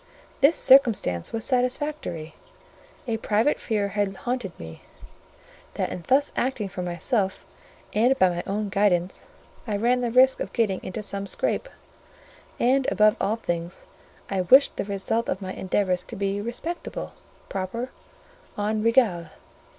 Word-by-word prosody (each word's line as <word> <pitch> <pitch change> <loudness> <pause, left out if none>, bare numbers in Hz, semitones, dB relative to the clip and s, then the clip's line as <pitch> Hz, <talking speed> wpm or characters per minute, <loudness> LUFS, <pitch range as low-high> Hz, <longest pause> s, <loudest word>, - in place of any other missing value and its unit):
This 280 +5 +5
circumstance 225 - +4
was 225 -1 +1
satisfactory: 250 - -1 0.7
a 225 -2 0
private 220 +6 +1
fear 210 -3 -1
had 200 -1 -1
haunted 240 -3 -4
me, 80 0 -9 0.9
that - - -2
in 175 - -6
thus 275 +2 +3
acting 240 -5 -1
for 185 - -6
myself, 190 +3 -1 0.5
and 245 +5 +3
by 185 - +5
my 175 0 -3
own 205 +1 -2
guidance, 190 -3 0 0.4
I 210 -2 -1
ran 245 +4 +2
the 240 - 0
risk 260 +3 +5
of - - -5
getting 210 -6 0
into 210 +3 -5
some 200 -1 -3
scrape; - - -1 0.9
and, 260 +2 +2
above 215 +1 +4
all 210 - +1
things, 175 -5 -4 0.4
I 195 -2 -1
wished 265 +11 +5
the - - -3
result 200 +3 -2
of 190 - -1
my 190 -1 -6
endeavours 185 -1 0
to - - -8
be 200 0 -2
respectable, 240 +10 -5 0.3
proper, 215 +7 -4 0.7
en 215 +1 -1
règle. 225 -8 +3
210 Hz, 145 wpm, -25 LUFS, 190-245 Hz, 0.9 s, This